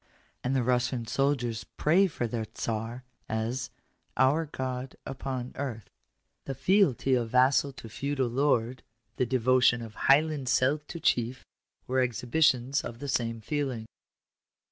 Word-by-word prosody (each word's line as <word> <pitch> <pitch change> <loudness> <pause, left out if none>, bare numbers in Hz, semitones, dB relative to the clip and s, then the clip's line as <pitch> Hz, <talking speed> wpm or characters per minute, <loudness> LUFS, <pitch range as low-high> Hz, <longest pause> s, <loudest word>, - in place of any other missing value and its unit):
And 130 +2 0
the 130 - +2
Russian 125 0 0
soldiers 125 -3 0
pray 180 +6 +2
for 145 -8 -3
their 115 -1 -3
Czar 115 +2 -3 0.3
as 115 +4 -2 0.2
" - - -43
our 155 +4 +1
God 130 -2 -4
upon 130 -2 -4
earth." 125 -7 -5 0.5
The 135 - -4
fealty 155 - +3
of 120 -3 +1
vassal 130 +3 +4
to 115 - -10
feudal 135 +3 -2
lord 125 -1 +1 0.2
— 110 -1 -47
the 125 - +1
devotion 125 -1 +3
of 110 -1 -9
Highland 145 +1 +2
Celt 135 +5 +2
to 170 - -7
chief—were 125 0 -2
exhibitions 125 +3 +2
of 120 - -7
the 140 - -6
same 115 -3 -1
feeling. 130 -3 -2
130 Hz, 140 wpm, -29 LUFS, 120-140 Hz, 0.5 s, vassal